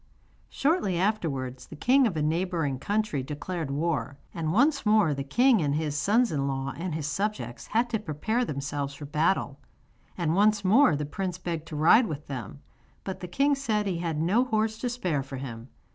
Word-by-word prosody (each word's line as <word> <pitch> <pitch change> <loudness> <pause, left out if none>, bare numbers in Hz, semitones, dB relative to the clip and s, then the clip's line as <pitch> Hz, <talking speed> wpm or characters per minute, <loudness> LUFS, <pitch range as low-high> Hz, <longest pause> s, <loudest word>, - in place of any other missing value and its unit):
Shortly 275 - +1
afterwards 150 - -2
the - - -10
king 255 - +4
of 180 -7 -3
a 150 - 0
neighbouring 160 -4 -1
country 205 -5 -1
declared 150 +3 -4
war, 145 -1 -2 0.2
and 160 -2 -2
once 275 - +3
more 210 -7 +4
the 140 0 -3
king 235 - +3
and 145 -2 0
his 150 -2 -1
sons 225 +10 +2
in 140 -2 -1
law 135 0 -2
and 165 +1 -4
his 155 -3 -3
subjects 145 - -3
had 230 +3 +1
to 220 - 0
prepare 215 +6 -1
themselves 140 - -3
for 145 - -8
battle, 150 -1 0 0.6
and 165 -3 0
once 205 +1 +3
more 230 - +5
the 150 +1 -2
prince 180 +4 -4
begged 165 -3 -4
to 155 - -7
ride 195 +11 +5
with 150 -2 -6
them, 135 +1 -7 0.4
but 190 - -5
the 180 - -6
king 275 +11 +2
said 225 -7 0
he 185 -4 -1
had 165 -3 -2
no 190 +10 +3
horse 220 -2 0
to 245 - -1
spare 180 - -1
for 135 0 -7
him. 120 -2 -7
170 Hz, 190 wpm, -27 LUFS, 145-215 Hz, 0.6 s, more